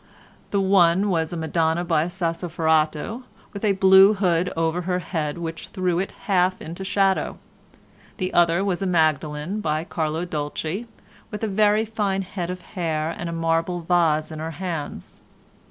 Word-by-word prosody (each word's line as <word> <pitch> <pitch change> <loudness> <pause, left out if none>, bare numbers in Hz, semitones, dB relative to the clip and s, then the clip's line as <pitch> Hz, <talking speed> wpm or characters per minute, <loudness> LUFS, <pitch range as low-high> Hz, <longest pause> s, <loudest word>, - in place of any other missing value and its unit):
The 200 - +1
one 190 0 +4
was 160 -2 0
a 175 - -4
Madonna 160 +1 0
by 160 -2 +2
Sassoferrato 165 +2 0 0.3
with 200 - -7
a 205 -2 +3
blue 190 +2 +7
hood 180 -3 +1
over 165 +2 0
her 180 +1 -1
head 160 -4 -3
which 165 -1 -5
threw 180 -3 -1
it 190 - -1
half 185 -2 +2
into 170 +4 -7
shadow. 195 0 +1 0.8
The 185 -2 -3
other 175 +2 +3
was 190 -2 -1
a 195 - 0
Magdalen 155 +2 0
by 155 -3 -1
Carlo 160 0 -2
Dolci 160 +6 -4 0.4
with 210 +1 -6
a - - +1
very 210 +2 +3
fine 205 -3 -1
head 180 -2 -5
of 180 0 -5
hair 160 -5 -2
and 175 - -5
a - - -4
marble 165 +1 0
vase 165 -2 +2
in 155 - -6
her 160 +1 -4
hands. 165 -5 -5
175 Hz, 160 wpm, -23 LUFS, 160-190 Hz, 0.8 s, blue